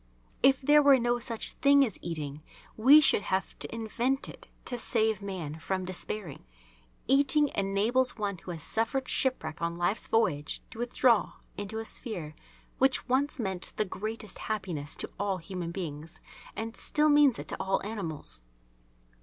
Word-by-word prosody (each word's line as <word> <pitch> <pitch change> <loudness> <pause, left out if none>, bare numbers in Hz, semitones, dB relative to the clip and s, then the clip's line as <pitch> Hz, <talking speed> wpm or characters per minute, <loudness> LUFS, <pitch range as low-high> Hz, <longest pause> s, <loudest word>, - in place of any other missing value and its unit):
If 270 0 +5
there 295 +2 +6
were 280 -2 +6
no 240 0 0
such 230 -2 0
thing 280 0 +4
as 220 - -4
eating 150 -3 -5 0.3
we 275 +7 +8
should 275 - +4
have 190 -1 -2
to - - -5
invent 235 +4 -1
it - - -11 0.2
to 245 - -2
save 220 -3 +1
man 175 -6 -5
from 185 +4 -2
despairing. 185 -3 -5 0.6
Eating 285 +2 +4
enables 215 +7 +1
one 200 -4 -3
who - - -12
has 165 -3 -4
suffered 230 +6 0
shipwreck 170 - -1
on 170 0 -1
Life's 175 +5 -1
voyage 165 -10 0
to 225 - -10
withdraw 240 -1 +2 0.2
into 205 +2 -5
a 225 - -4
sphere 185 - -4 0.5
which 265 -1 +2
once 270 +3 +1
meant 190 -6 -1
the 215 - 0
greatest 215 +2 -6
happiness 180 -9 -4
to - - -4
all 200 -2 0
human 180 -1 -5
beings 165 -3 -6 0.4
and 225 +1 -5
still 300 0 +1
means 290 -4 +5
it - - -7
to - - -3
all 195 0 +1
animals. 165 - -5
215 Hz, 160 wpm, -29 LUFS, 180-250 Hz, 0.6 s, we